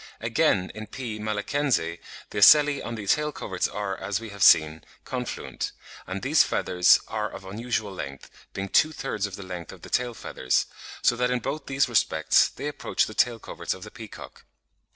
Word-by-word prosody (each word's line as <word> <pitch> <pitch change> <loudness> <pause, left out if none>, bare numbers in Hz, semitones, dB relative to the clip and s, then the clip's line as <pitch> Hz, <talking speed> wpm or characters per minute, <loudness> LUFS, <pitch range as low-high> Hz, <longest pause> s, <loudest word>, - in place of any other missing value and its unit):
Again, 90 - +1
in 110 +1 -8
P. 115 -1 -6
malaccense, 105 - -1 0.3
the - - -6
ocelli 145 +5 +7
on 120 - -5
the 105 -2 -6
tail 150 +9 +2
coverts 95 -9 -2
are, 100 -2 -3
as 100 +1 -3
we 115 -1 -8
have 100 -1 -10
seen, 80 -4 +6 0.2
confluent; - - -4 0.3
and - - -5
these - - +5
feathers 90 0 +4
are 105 -1 -2
of 95 - -10
unusual 110 +1 -3
length, 70 -6 -8 0.2
being 100 0 -4
two 155 +9 +4
thirds 105 -9 -3
of 100 - -8
the 100 - -8
length 90 -3 -7
of - - -14
the - - -11
tail 120 -1 0
feathers, 65 - 0 0.4
so 120 - +4
that 125 +1 +1
in 125 - +1
both 135 +5 -4
these 140 0 +2
respects 120 -4 +3
they 140 - -6
approach 150 - 0
the 110 - -8
tail 120 +1 +2
coverts - - -5
of - - -11
the - - -10
peacock. - - -11
110 Hz, 190 wpm, -26 LUFS, 95-125 Hz, 0.4 s, ocelli